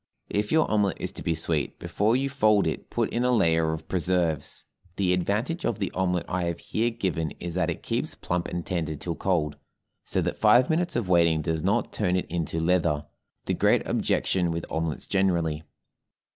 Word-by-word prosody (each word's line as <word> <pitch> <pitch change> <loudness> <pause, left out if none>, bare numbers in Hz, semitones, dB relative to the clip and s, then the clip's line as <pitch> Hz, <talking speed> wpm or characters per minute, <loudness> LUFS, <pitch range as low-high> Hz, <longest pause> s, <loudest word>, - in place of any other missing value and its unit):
If 105 +1 -1
your 160 0 +4
omelet 105 -4 +2
is - - -2
to - - -8
be 85 - 0
sweet, 80 -1 -1
before 110 +3 +1
you 135 +2 +1
fold 110 -7 +3
it - - -3
put - - -1
in 120 - 0
a 125 - +2
layer 80 -9 +3
of 80 0 -6
preserves. 90 -4 0 0.3
The 95 -2 +2
advantage 105 - -1
of 115 - 0
the 100 -3 -2
omelet 90 -2 0
I 90 -1 -1
have 85 -1 -2
here 115 +6 -1
given 90 -9 -2
is 85 -1 -5
that 90 - 0
it - - -4
keeps - - -2
plump 90 0 -2
and 85 -1 -4
tender 80 -4 -2
till 85 +4 -4
cold, 80 -5 0 0.5
so - - -2
that - - -3
five 120 +6 +5
minutes 175 +2 0
of 120 -5 0
waiting 85 -3 +3
does 80 0 -1
not 105 +7 0
turn 90 -4 +1
it 90 - 0
into 80 -1 -2
leather, 80 -3 +1 0.4
the - - 0
great - - +3
objection 90 -2 +1
with 85 0 -3
omelets 80 -1 -2
generally. 85 -5 +1
90 Hz, 195 wpm, -26 LUFS, 80-105 Hz, 0.5 s, five